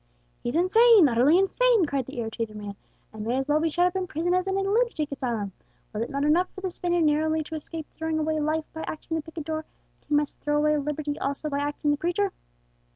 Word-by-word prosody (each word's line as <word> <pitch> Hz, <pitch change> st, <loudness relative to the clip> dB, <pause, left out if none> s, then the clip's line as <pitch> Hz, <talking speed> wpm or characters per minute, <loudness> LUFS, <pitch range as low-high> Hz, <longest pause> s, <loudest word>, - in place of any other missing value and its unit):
"He's 240 Hz, -, -3 dB
insane, 410 Hz, +2 st, +6 dB
utterly 255 Hz, +7 st, +4 dB
insane!" 440 Hz, +1 st, +3 dB
cried 275 Hz, -4 st, -2 dB
the 265 Hz, -, -9 dB
irritated 225 Hz, -1 st, -4 dB
man, 205 Hz, -1 st, -7 dB, 0.4 s
"and 215 Hz, -1 st, -6 dB
may 235 Hz, +4 st, 0 dB
as 270 Hz, +1 st, -1 dB
well 295 Hz, +1 st, +3 dB
be 325 Hz, +1 st, +1 dB
shut 350 Hz, +3 st, +2 dB
up 360 Hz, +1 st, 0 dB
in 375 Hz, -1 st, -1 dB
prison 335 Hz, +3 st, -1 dB
as 365 Hz, +1 st, +1 dB
in 385 Hz, 0 st, 0 dB
a -, -, +1 dB
lunatic 395 Hz, -7 st, 0 dB
asylum. 235 Hz, -7 st, -2 dB, 0.4 s
Was 210 Hz, -, -3 dB
it 230 Hz, -, -2 dB
not 280 Hz, -1 st, -2 dB
enough 345 Hz, +5 st, +3 dB
for 380 Hz, -, -8 dB
this 375 Hz, -2 st, -3 dB
Spaniard 350 Hz, -1 st, 0 dB
narrowly 315 Hz, +1 st, +2 dB
to 315 Hz, -, -7 dB
escape 315 Hz, +1 st, -6 dB
throwing 320 Hz, -1 st, -2 dB
away 310 Hz, 0 st, 0 dB
life 310 Hz, +1 st, 0 dB
by 320 Hz, -, -6 dB
acting 320 Hz, +1 st, -4 dB
the 320 Hz, -, -1 dB
picador, 315 Hz, 0 st, -5 dB
that -, -, -38 dB
he 300 Hz, -, +1 dB
must 295 Hz, 0 st, 0 dB
throw 295 Hz, 0 st, 0 dB
away 300 Hz, 0 st, +3 dB
liberty 295 Hz, 0 st, -3 dB
also 280 Hz, +2 st, -3 dB
by 280 Hz, -, 0 dB
acting 290 Hz, +1 st, -1 dB
the 290 Hz, -, +1 dB
preacher?" 355 Hz, +5 st, 0 dB
310 Hz, 230 wpm, -26 LUFS, 285-350 Hz, 0.4 s, insane